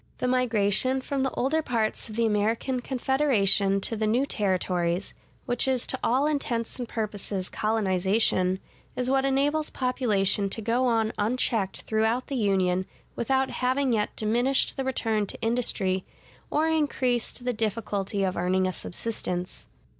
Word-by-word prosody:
The -, -, -1 dB
migration 250 Hz, 0 st, +2 dB
from 270 Hz, +1 st, -2 dB
the 265 Hz, -, +1 dB
older 295 Hz, +5 st, +1 dB
parts 230 Hz, -6 st, -2 dB
of 215 Hz, -, -8 dB
the 230 Hz, 0 st, +2 dB
American 225 Hz, +4 st, 0 dB
Confederation 240 Hz, -7 st, +2 dB
to 225 Hz, -, 0 dB
the 215 Hz, 0 st, -1 dB
new 245 Hz, +6 st, +2 dB
Territories, 185 Hz, -5 st, -1 dB, 0.3 s
which 245 Hz, +1 st, +1 dB
is 260 Hz, -2 st, +1 dB
to -, -, -3 dB
all 260 Hz, +4 st, +2 dB
intents 255 Hz, -6 st, -2 dB
and 245 Hz, -, -4 dB
purposes 205 Hz, -3 st, -3 dB
colonization, 190 Hz, -3 st, +1 dB, 0.4 s
is 250 Hz, +1 st, -1 dB
what 270 Hz, 0 st, +2 dB
enables 290 Hz, +3 st, +1 dB
population 210 Hz, -6 st, +1 dB
to 210 Hz, -, -2 dB
go 235 Hz, +4 st, +1 dB
on 225 Hz, -2 st, +1 dB
unchecked 215 Hz, -2 st, 0 dB
throughout 220 Hz, +3 st, 0 dB
the 275 Hz, -, -2 dB
Union 190 Hz, -4 st, +1 dB, 0.3 s
without 265 Hz, +2 st, 0 dB
having 255 Hz, 0 st, +1 dB
yet 210 Hz, -2 st, -1 dB
diminished 240 Hz, +5 st, +1 dB
the 270 Hz, -, -2 dB
return 225 Hz, -5 st, 0 dB
to -, -, -5 dB
industry, 220 Hz, -5 st, 0 dB, 0.5 s
or 310 Hz, +2 st, +1 dB
increased 260 Hz, -6 st, 0 dB
the 250 Hz, -, 0 dB
difficulty 210 Hz, -2 st, -2 dB
of 185 Hz, -1 st, 0 dB
earning 185 Hz, +2 st, +1 dB
a 185 Hz, -, -1 dB
subsistence. 180 Hz, -3 st, -3 dB
225 Hz, 145 wpm, -26 LUFS, 200-255 Hz, 0.5 s, migration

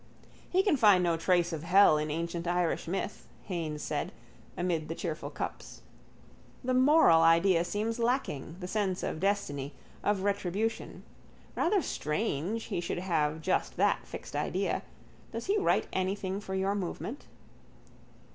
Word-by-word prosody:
—He 375 Hz, +1 st, +3 dB
can 385 Hz, -8 st, +3 dB
find 205 Hz, -7 st, +6 dB
no 170 Hz, -1 st, +2 dB
trace 175 Hz, +1 st, +2 dB
of 155 Hz, -, -3 dB
hell 175 Hz, -2 st, +5 dB
in 150 Hz, 0 st, -2 dB
ancient 170 Hz, +2 st, -3 dB
Irish 175 Hz, -2 st, 0 dB
myth, 195 Hz, +3 st, -4 dB, 0.2 s
Haines 160 Hz, -5 st, -4 dB
said, -, -, -2 dB, 0.5 s
amid 170 Hz, -3 st, -1 dB
the 165 Hz, -, -3 dB
cheerful 165 Hz, -2 st, -4 dB
cups. -, -, -6 dB, 0.8 s
The 255 Hz, 0 st, 0 dB
moral 255 Hz, -, +6 dB
idea 165 Hz, +2 st, +5 dB
seems 215 Hz, +6 st, -2 dB
lacking, 230 Hz, -, -1 dB
the 180 Hz, -, -5 dB
sense 190 Hz, -2 st, -1 dB
of -, -, -3 dB
destiny, 150 Hz, -8 st, -1 dB, 0.3 s
of 200 Hz, -2 st, +1 dB
retribution. 200 Hz, +2 st, -2 dB, 0.5 s
Rather 380 Hz, 0 st, +2 dB
strange 190 Hz, -, -2 dB
he 190 Hz, -6 st, -3 dB
should 175 Hz, +1 st, -3 dB
have 160 Hz, -4 st, 0 dB
just 185 Hz, -, 0 dB
that -, -, +2 dB
fixed -, -, -8 dB
idea. -, -, -1 dB, 0.5 s
Does 230 Hz, +1 st, -5 dB
he 410 Hz, +2 st, +2 dB
write 395 Hz, -, +2 dB
anything 190 Hz, +1 st, -1 dB
for 190 Hz, -2 st, -5 dB
your 190 Hz, +1 st, +1 dB
movement? 205 Hz, +6 st, -4 dB
185 Hz, 145 wpm, -30 LUFS, 165-210 Hz, 0.8 s, find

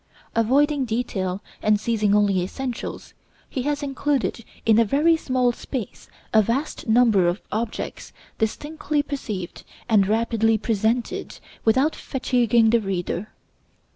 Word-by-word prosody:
Avoiding 275 Hz, +5 st, +2 dB
detail, 205 Hz, -5 st, -2 dB, 0.2 s
and 210 Hz, -1 st, +3 dB
seizing 210 Hz, -2 st, +1 dB
only 200 Hz, -3 st, +3 dB
essentials, 245 Hz, +7 st, -5 dB, 0.3 s
he 260 Hz, -, -3 dB
has 290 Hz, 0 st, -2 dB
included 275 Hz, -3 st, -1 dB, 0.2 s
in 225 Hz, 0 st, +5 dB
a -, -, +6 dB
very 295 Hz, +9 st, +3 dB
small 255 Hz, -5 st, +1 dB
space 240 Hz, -2 st, -6 dB, 0.2 s
a 220 Hz, -, +7 dB
vast 245 Hz, +9 st, -2 dB
number 220 Hz, -5 st, +4 dB
of 175 Hz, +4 st, 0 dB
objects 220 Hz, +1 st, -4 dB, 0.3 s
distinctly 295 Hz, +6 st, -1 dB
perceived, 215 Hz, -11 st, -5 dB, 0.2 s
and 210 Hz, -5 st, +4 dB
rapidly 225 Hz, 0 st, +2 dB
presented, 225 Hz, +2 st, -1 dB, 0.3 s
without 260 Hz, +8 st, +3 dB
fatiguing 240 Hz, -4 st, +2 dB
the 235 Hz, -, +4 dB
reader. 195 Hz, 0 st, -3 dB
230 Hz, 120 wpm, -23 LUFS, 210-265 Hz, 0.3 s, a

